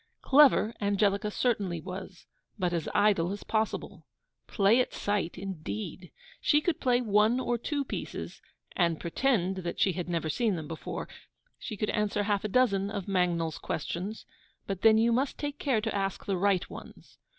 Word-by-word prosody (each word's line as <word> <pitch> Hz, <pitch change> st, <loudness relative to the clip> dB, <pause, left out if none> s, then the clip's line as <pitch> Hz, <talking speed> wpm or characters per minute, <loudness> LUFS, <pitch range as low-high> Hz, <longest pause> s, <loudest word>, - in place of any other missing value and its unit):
Clever 270 Hz, -5 st, +5 dB
Angelica 200 Hz, +1 st, +1 dB
certainly 205 Hz, -7 st, 0 dB
was, 185 Hz, +1 st, -8 dB, 0.3 s
but 180 Hz, -3 st, 0 dB
as 165 Hz, -3 st, -2 dB
IDLE 200 Hz, -4 st, +3 dB
as 205 Hz, -, -7 dB
POSSIBLE. 220 Hz, 0 st, -2 dB, 0.4 s
Play 210 Hz, +3 st, +4 dB
at 250 Hz, -, 0 dB
sight, 205 Hz, -4 st, -1 dB
indeed! 175 Hz, -, -6 dB, 0.3 s
she 295 Hz, -, +4 dB
could 315 Hz, +1 st, -1 dB
play 250 Hz, -1 st, +2 dB
one 215 Hz, +2 st, +3 dB
or 245 Hz, -2 st, 0 dB
two 285 Hz, +3 st, -2 dB
pieces, -, -, -6 dB, 0.3 s
and 170 Hz, -3 st, +1 dB
pretend 190 Hz, 0 st, 0 dB
that 175 Hz, -2 st, -4 dB
she 190 Hz, -, +4 dB
had 175 Hz, 0 st, -4 dB
never 165 Hz, -2 st, -1 dB
seen 220 Hz, +4 st, +1 dB
them 155 Hz, -3 st, -6 dB
before; 160 Hz, 0 st, -5 dB, 0.5 s
she 215 Hz, -, -6 dB
could 210 Hz, -, -1 dB
answer 210 Hz, -1 st, 0 dB
half 205 Hz, 0 st, 0 dB
a -, -, 0 dB
dozen 200 Hz, -4 st, +2 dB, 0.2 s
Mangnall's 175 Hz, -4 st, 0 dB
Questions; 185 Hz, +8 st, -4 dB, 0.4 s
but 195 Hz, -1 st, -4 dB
then 220 Hz, -1 st, +6 dB
you 230 Hz, +1 st, +3 dB
must 260 Hz, +4 st, 0 dB
take 290 Hz, 0 st, -4 dB
care 250 Hz, -6 st, +1 dB
to 220 Hz, 0 st, -2 dB
ask 195 Hz, -1 st, -2 dB
the 195 Hz, -, 0 dB
RIGHT 195 Hz, 0 st, +1 dB
ones. -, -, -12 dB
200 Hz, 165 wpm, -29 LUFS, 180-225 Hz, 0.5 s, then